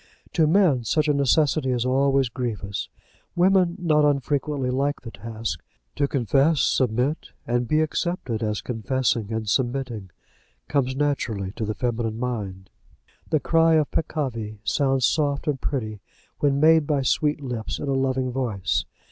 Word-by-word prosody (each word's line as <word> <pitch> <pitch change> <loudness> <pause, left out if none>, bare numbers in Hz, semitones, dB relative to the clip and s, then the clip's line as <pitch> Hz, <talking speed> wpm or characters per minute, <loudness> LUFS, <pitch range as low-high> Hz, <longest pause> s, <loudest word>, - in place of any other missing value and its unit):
To 160 -3 +3
men 160 -8 +3
such 150 +8 +1
a 150 - +3
necessity 140 0 +2
is 125 -1 0
always 135 +1 +2
grievous. 110 -5 -4 0.5
Women 180 -1 +3
not 155 -5 +2
unfrequently 145 -1 0
like 140 +3 -1
the 115 - -7
task. 110 -8 -5 0.3
To 140 - +1
confess, 140 +4 +2
submit, 130 +4 0
and 120 0 0
be 155 +4 +2
accepted 155 -7 -2
as 105 -2 -1
confessing 115 -1 -1
and 110 -1 -3
submitting, 120 -3 -1 0.6
comes 130 -2 0
naturally 125 -9 -1
to 110 - -4
the 105 0 -3
feminine 115 -2 -2
mind. 100 -7 -4 0.6
The 155 - +2
cry 165 +2 +3
of 155 -2 +1
peccavi 120 -9 -3
sounds 135 +1 +2
soft 145 -2 0
and 140 -3 -1
pretty 110 -7 -3 0.4
when 140 -1 +2
made 160 0 +5
by 145 -3 +1
sweet 150 +3 +1
lips 125 -6 -4
in 145 - -5
a 135 - +1
loving 130 -1 0
voice. 120 -7 -1
130 Hz, 150 wpm, -24 LUFS, 115-145 Hz, 0.6 s, made